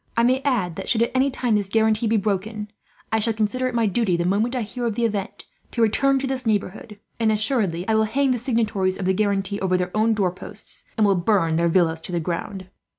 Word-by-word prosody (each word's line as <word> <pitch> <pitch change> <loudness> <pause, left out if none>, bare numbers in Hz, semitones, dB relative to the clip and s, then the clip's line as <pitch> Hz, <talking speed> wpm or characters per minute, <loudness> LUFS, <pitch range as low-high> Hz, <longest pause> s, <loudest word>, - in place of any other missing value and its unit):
"I 230 - +4
may 255 +2 +3
add 225 - -1
that, - - -5
should 230 -1 +3
at 235 - -1
any 265 +2 +2
time 250 -3 -1
this 205 -2 0
guarantee 220 +1 +2
be 220 +1 +2
broken, 210 +1 -2 0.4
I 220 - +2
shall 225 +1 0
consider 220 +4 0
it 250 - -4
my 230 -1 +2
duty, 200 -3 +1
the 170 - -1
moment 215 +7 +1
I 245 - -1
hear 240 +3 -4
of 220 - -2
the 235 - +1
event, 205 -3 -3 0.2
to 235 - -3
return 275 +5 +3
to - - -2
this 265 -1 -2
neighbourhood; 210 -1 -2 0.2
and 225 -1 +3
assuredly 210 -6 0
I 220 - +2
will 220 0 +3
hang 265 +5 +1
the 245 - 0
signatories 220 -6 0
of 195 - -4
the 190 - +2
guarantee 200 0 0
over 185 -1 +1
their 180 +1 -3
own 220 +1 +2
door 190 -4 +1
posts, 180 - -9
and 215 - +4
will 200 - +4
burn 175 -3 +1
their 170 0 +2
villas 165 -2 +2
to 180 - -8
the 175 - 0
ground. 180 +3 -4
215 Hz, 245 wpm, -23 LUFS, 190-235 Hz, 0.4 s, I